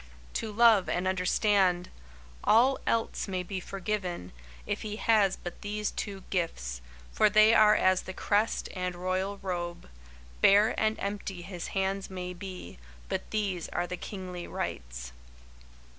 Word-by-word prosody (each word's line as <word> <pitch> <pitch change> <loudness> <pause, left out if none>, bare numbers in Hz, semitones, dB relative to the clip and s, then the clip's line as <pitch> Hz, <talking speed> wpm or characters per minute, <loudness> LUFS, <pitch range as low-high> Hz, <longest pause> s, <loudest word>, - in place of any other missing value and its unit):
"To 220 - -3
Love 220 -3 +5
and 180 +1 0
Understand!" 185 -1 +2 0.5
All 250 +5 +5
else 225 -1 0
may 185 -2 -2
be 190 +1 -4
forgiven, 185 - -4 0.3
if - - -2
he 210 -1 -4
has 210 -4 +3
but 175 - -8
these 210 0 -2
two 195 -2 -5
gifts, 60 - -2 0.3
for 210 - +4
they 215 +2 +6
are 215 -1 +7
as 185 -2 +3
the - - -7
crest 205 +3 +1
and 180 -1 -2
royal 185 +3 -2
robe. 175 - -4 0.5
Bare 205 +2 +6
and 220 0 +1
empty 200 -3 -4
his 180 -2 -6
hands 195 0 -1
may 180 -1 -5
be, 180 - -8 0.3
but - - -3
these 195 -6 -2
are 175 - -1
the 180 - -4
kingly 180 -1 -7
rights. - - -5
190 Hz, 145 wpm, -29 LUFS, 180-210 Hz, 0.5 s, are